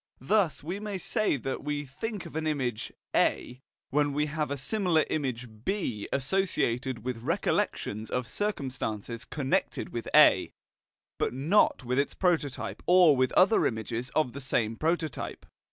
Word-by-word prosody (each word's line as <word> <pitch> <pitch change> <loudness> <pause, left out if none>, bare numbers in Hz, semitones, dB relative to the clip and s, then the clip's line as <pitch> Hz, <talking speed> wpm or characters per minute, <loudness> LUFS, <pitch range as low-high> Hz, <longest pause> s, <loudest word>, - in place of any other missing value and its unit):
Thus 175 +2 +1
we 180 +6 -4
may 210 -2 -4
say 215 - +1
that 135 +2 -4
we 145 0 -2
think 190 - -5
of 165 - -10
an 160 0 -1
image 130 -7 -2 0.2
A 125 +1 +1 0.3
when 145 0 +2
we 150 +1 +1
have 150 -1 -2
a 140 - -2
similar 175 - +1
image 130 -5 -2 0.2
B 135 - -2
associated 135 - 0
with 125 -3 -3
recollections 110 -2 -1
of 125 -2 -2
circumstances 125 - -3
connected 135 -2 -1
with - - -5
A, - - +6 0.7
but - - 0
not 155 +4 +3
with 125 +2 0
its 140 - -1
prototype 165 -7 -1
or 180 -4 +7
with 130 -1 +2
other 195 +4 +5
images 115 +2 -4
of 155 -6 +1
the 140 - -7
same 115 -4 0
prototype. 160 0 -2
140 Hz, 150 wpm, -28 LUFS, 125-170 Hz, 0.7 s, or